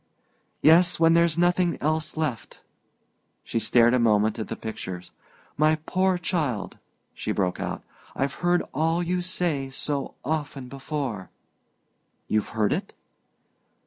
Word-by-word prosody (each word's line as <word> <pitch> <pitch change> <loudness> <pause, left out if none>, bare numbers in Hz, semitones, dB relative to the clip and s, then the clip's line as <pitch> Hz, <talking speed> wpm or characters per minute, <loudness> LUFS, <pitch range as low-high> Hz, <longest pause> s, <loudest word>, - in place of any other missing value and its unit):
"Yes; 170 +3 +6
when 165 0 +5
there's 170 -1 +3
nothing 175 0 +2
else 155 +1 -1
left." 145 -8 -3 0.8
She 115 - -2
stared 120 +1 +4
a 125 - +3
moment 110 -1 +3
at 110 - -3
the - - -4
pictures. 95 -5 -7 0.5
"My 155 +1 +4
poor 185 0 +2
child," 155 - -2 0.3
she - - -4
broke 90 -3 -1
out, - - -4 0.3
"I've 140 +1 -1
heard 175 0 +3
all 165 +4 +1
you 180 +1 -1
say 170 -6 -1
so 140 +1 -3
often 145 -3 -3
before!" 135 - -4 1.0
"You've 110 -1 0
heard 105 -2 +3
it?" - - -4
150 Hz, 130 wpm, -25 LUFS, 115-170 Hz, 1.0 s, Yes